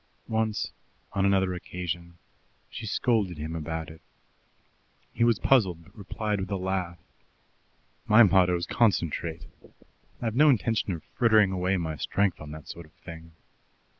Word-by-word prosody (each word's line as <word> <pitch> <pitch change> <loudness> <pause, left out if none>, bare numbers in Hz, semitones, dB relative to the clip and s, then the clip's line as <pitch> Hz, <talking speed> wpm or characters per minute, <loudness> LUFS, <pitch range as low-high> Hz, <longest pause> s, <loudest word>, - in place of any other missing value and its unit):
Once 110 -1 -1 0.4
on 95 - +1
another 95 -2 +2
occasion 85 -1 -6 0.5
she 110 - -6
scolded 105 -6 0
him 80 +2 -5
about 80 0 -4
it. 80 0 -12 1.1
He - - +1
was 115 -2 +4
puzzled, 95 -12 +2
but - - -21
replied 105 0 -3
with 95 - -4
a 100 - -1
laugh: 95 -2 -2 1.1
"My 110 +3 +8
motto 90 -3 +4
is 85 - -3
Concentrate. 85 -7 0 0.7
I've 115 -2 -2
no 150 +5 +5
intention 115 -5 +1
of 80 - -7
frittering 110 -5 +3
away 95 +1 0
my 80 -3 -3
strength 100 0 0
on 75 - -8
that 75 0 -9
sort 85 -2 -9
of 75 - -27
thing." 80 -1 -12
95 Hz, 145 wpm, -27 LUFS, 85-105 Hz, 1.1 s, My